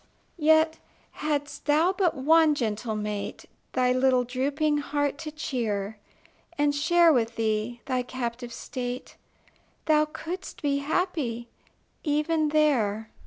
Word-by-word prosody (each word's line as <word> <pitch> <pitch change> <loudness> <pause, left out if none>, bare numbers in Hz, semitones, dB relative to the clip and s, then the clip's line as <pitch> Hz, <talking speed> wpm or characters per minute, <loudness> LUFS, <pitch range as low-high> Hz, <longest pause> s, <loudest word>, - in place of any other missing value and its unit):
Yet, 315 +1 +4 0.3
hadst 290 -1 -3
thou 315 +5 +3
but 370 -4 +1
one 310 +2 +4
gentle 220 -3 -2
mate 210 -1 -4 0.3
Thy 250 -1 +2
little 255 0 +3
drooping 285 +5 0
heart 290 -1 -1
to 310 - -5
cheer, 220 -8 -3 0.6
And 290 0 +2
share 335 +3 +4
with 230 -3 0
thee 220 +2 -1
thy 255 -1 0
captive 245 -1 -5
state, 245 +1 -5 0.7
Thou 305 -1 +4
couldst 335 +4 -7
be 280 -1 +1
happy 280 -7 -2 0.5
even 305 +1 +1
there. 225 -9 +1
280 Hz, 120 wpm, -27 LUFS, 240-310 Hz, 0.7 s, Yet